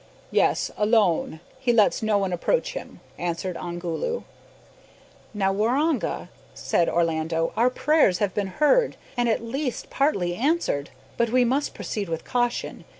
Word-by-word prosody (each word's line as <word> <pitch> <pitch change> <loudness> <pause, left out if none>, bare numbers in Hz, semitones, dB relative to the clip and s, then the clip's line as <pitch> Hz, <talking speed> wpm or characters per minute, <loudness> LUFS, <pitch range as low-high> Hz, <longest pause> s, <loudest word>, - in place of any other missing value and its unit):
"Yes, - - +2
alone. 210 -7 +2 0.2
He 260 -2 +2
lets 220 -3 +3
no 215 -2 +2
one 195 -2 -1
approach 485 - 0
him," - - -8 0.2
answered 175 +1 -3
Ongoloo. 175 - -3 1.1
"Now, 195 -2 0
Waroonga," 255 +9 0 0.3
said 170 - +1
Orlando, 165 -1 0
"our 240 +3 +4
prayers 280 - +3
have 200 -3 0
been 205 -2 -1
heard, 470 +11 +3 0.2
and 240 -1 +1
at 225 - 0
least 260 +2 -3
partly 195 - +1
answered. 240 - 0 0.3
But 235 -1 +2
we 250 +1 +3
must 270 +4 0
proceed 200 -4 -4
with 165 -1 -4
caution. 245 -1 -1
215 Hz, 140 wpm, -25 LUFS, 175-260 Hz, 1.1 s, our